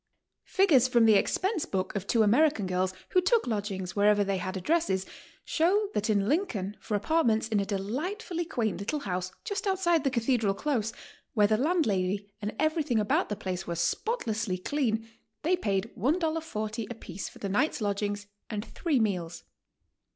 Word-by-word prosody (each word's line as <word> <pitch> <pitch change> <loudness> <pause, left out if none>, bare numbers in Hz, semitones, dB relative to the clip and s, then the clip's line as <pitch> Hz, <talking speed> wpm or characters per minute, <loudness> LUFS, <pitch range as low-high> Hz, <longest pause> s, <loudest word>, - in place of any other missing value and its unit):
Figures 330 - +4
from 240 -2 +4
the 220 - +7
ex 195 - +2
pense 380 -3 -1
book 190 +1 -2
of 200 0 -3
two 230 -2 +4
American 235 +1 +3
girls 185 0 0 0.2
who 365 - +4
took 455 +5 +3
lodgings 200 -5 -3
wher 205 0 +3
ever 205 -1 +4
they 195 -1 0
had 185 +1 -3
addresses, 190 - +1 0.4
show 395 +6 +2
that 210 +2 -1
in 200 -2 +2
Lincoln 220 - -1
for 210 - -3
apartments 225 -2 +2
in 215 -2 +2
a 200 - -1
delightfully 325 - -3
quaint 225 - -1
little 285 +9 -2
house 185 -3 -3
just 405 -1 -2
outside 350 -5 +2
the 275 - +2
cathedral 235 -4 +1
close, 230 -3 -1 0.4
where 210 -2 +5
the 215 +1 +3
landlady 205 - 0
and 210 +1 -3
everything 310 -5 +1
about 210 -1 +1
the 210 - -1
place 185 -2 -4
were 170 - -2
spotlessly 220 - -1
clean, 225 0 -1 0.4
they 350 +4 +3
paid 200 - -1
$1.40 260 - -1
apiece 195 -5 -6
for - - -15
the 200 - -4
night's 250 +11 +1
lodg 205 -2 -1
ing 205 0 -1 0.3
and 210 -1 -3
three 310 -7 0
meels. 175 -6 -1
220 Hz, 175 wpm, -29 LUFS, 200-310 Hz, 0.4 s, the